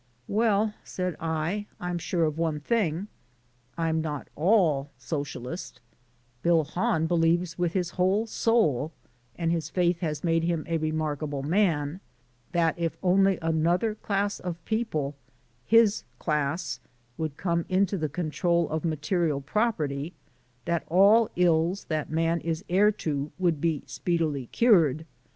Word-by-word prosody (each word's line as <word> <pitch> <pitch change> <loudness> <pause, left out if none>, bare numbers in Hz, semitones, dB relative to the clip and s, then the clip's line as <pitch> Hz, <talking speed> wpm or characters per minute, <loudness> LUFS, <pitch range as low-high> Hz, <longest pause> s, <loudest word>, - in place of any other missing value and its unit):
"Well," 215 0 +2
said 180 -2 -3
I, 165 +6 -2
"I'm 180 -1 -3
sure 170 0 0
of 155 0 -1
one 160 -2 0
thing. 185 0 0 0.7
I'm 160 -1 0
not 150 -3 -4
ALL 160 -5 +3
Socialist, 140 +2 -5 0.6
Bill 170 0 +3
Hahn 160 +1 0
believes 165 +1 +1
with 175 -1 0
his 180 -3 -1
whole 190 +5 +1
soul 165 - +1 0.4
(and 165 -1 0
his 165 -2 -1
faith 175 0 +1
has 150 -4 -3
made 165 -1 +2
him 165 -2 -1
a 165 -1 -1
remarkable 155 -2 -2
man) 165 -2 +1 0.5
that 170 -1 +1
if 165 -1 -1
only 195 +1 +4
another 170 +7 +1
class 205 -1 -1
of 170 -2 -6
people 185 -11 -1 0.5
his 225 -2 +5
class 150 +2 -1 0.4
could 155 -1 -4
come 170 -2 0
into 190 +1 +2
the 155 -5 -2
control 170 +1 0
of 160 0 -2
material 160 -1 0
property, 155 -3 -1 0.5
that 170 -1 0
all 200 +7 +6
the 180 - -1
ills 170 +3 +2
that 155 -2 -1
man 165 +1 +1
is 165 +3 -3
heir 200 +4 +5
to 150 -7 -3
would 170 -5 +1
be 160 -4 0
speedily 155 -7 -1
cured. 160 - +3
165 Hz, 135 wpm, -27 LUFS, 155-185 Hz, 0.7 s, all